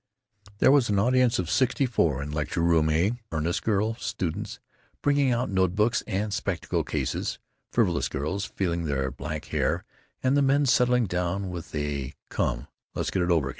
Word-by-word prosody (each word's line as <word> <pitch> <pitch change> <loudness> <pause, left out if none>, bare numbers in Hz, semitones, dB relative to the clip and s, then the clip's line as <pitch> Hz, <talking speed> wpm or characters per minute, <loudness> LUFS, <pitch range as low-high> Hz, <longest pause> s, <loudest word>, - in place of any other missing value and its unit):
There 130 - +5
was 140 -5 +4
an 100 - +2
audience 125 +3 +3
of 90 - -1
sixty 135 - +2
four 80 - +1
in 75 - -5
Lecture 75 +2 -2
room 80 -2 +3
A—earnest 85 -1 0
girl 110 +1 +1
students 90 -6 -3 0.4
bringing 145 -2 +3
out 120 -2 0
note 95 -2 +2
books 110 +3 +2
and 105 0 -1
spectacle - - -1
cases, - - -2 0.3
frivolous - - +2
girls 90 +9 -2
feeling 85 -5 -2
their 70 -2 -1
back 75 +4 -5
hair, - - +1 0.4
and 130 +1 +3
the 145 - +4
men 140 +1 +3
settling 125 -1 +3
down 90 +1 -2
with 85 -3 -7
a 70 -2 -3
"Come, - - -1 0.3
let's - - -1
get 95 - 0
it 90 - 0
over!" 80 -6 +2
95 Hz, 170 wpm, -26 LUFS, 80-120 Hz, 0.4 s, There